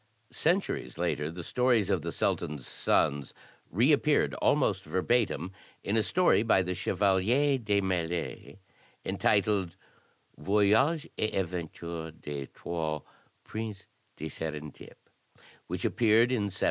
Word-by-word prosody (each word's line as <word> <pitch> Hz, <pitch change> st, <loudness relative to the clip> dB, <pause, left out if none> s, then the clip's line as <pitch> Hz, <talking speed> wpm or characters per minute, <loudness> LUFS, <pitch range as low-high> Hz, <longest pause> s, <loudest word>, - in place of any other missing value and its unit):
Centuries 180 Hz, +5 st, 0 dB
later 75 Hz, +2 st, -1 dB
the 85 Hz, +1 st, -7 dB
stories 125 Hz, -1 st, +2 dB
of -, -, +1 dB
the -, -, -4 dB
Sultan's 75 Hz, -4 st, -1 dB
sons 70 Hz, -1 st, 0 dB, 0.3 s
reappeared 145 Hz, -, +3 dB
almost 105 Hz, -10 st, +2 dB
verbatim 95 Hz, -, 0 dB, 0.3 s
in 100 Hz, -, -1 dB
a 110 Hz, -, +4 dB
story 175 Hz, -, +3 dB
by 110 Hz, -4 st, +3 dB
the 90 Hz, 0 st, -2 dB
Chevalier 100 Hz, +9 st, +2 dB
de 105 Hz, -3 st, +1 dB
Mailly, 90 Hz, -1 st, -3 dB, 0.5 s
entitled 100 Hz, -4 st, +1 dB, 0.6 s
"Voyage 105 Hz, -, +3 dB
et 110 Hz, -, 0 dB
Aventure 85 Hz, -2 st, -4 dB
des 70 Hz, -2 st, -5 dB
Trois 80 Hz, -3 st, -4 dB, 0.4 s
Princes 110 Hz, -3 st, -6 dB, 0.3 s
de 80 Hz, -, -7 dB
Sarendip," 75 Hz, -1 st, -7 dB, 0.7 s
which -, -, -3 dB
appeared 115 Hz, +1 st, +4 dB
in 115 Hz, -5 st, +1 dB
1719. 100 Hz, -, -3 dB
100 Hz, 115 wpm, -29 LUFS, 85-115 Hz, 0.7 s, a